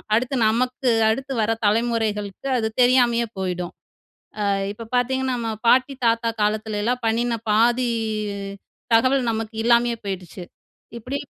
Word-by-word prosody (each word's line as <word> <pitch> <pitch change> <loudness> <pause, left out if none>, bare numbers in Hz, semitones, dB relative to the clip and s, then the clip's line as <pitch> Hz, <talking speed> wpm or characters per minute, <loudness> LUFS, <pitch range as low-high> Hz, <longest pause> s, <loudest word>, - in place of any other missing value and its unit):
அடுத்து, 255 +4 0
நமக்கு 250 +3 0 0.2
அடுத்து 270 +4 -2
வர 215 +1 +1
தலைமுறைகளுக்கு 215 -1 0
அது 220 -2 0
தெரியாமையே 245 -2 +4
போயிடும். 180 -2 -3 0.7
அ - - +1 0.3
இப்ப 225 +1 -10
பார்த்தீங்கன்னா, 260 +1 0
நம்ம 230 -1 -2 0.2
பாட்டி 260 +3 +3
தாத்தா 230 0 +1
காலத்துலல்லாம் 215 +3 -1
பண்ணின 230 +1 0
பாதி 240 +3 +3 1.1
தகவல் 255 +1 +3
நமக்கு 225 0 -4
இல்லாமயே 235 0 +3
போயிடுச்சு. 185 -2 -6 0.6
இப்படி 250 +5 -4
230 Hz, 115 wpm, -22 LUFS, 215-250 Hz, 1.1 s, தெரியாமையே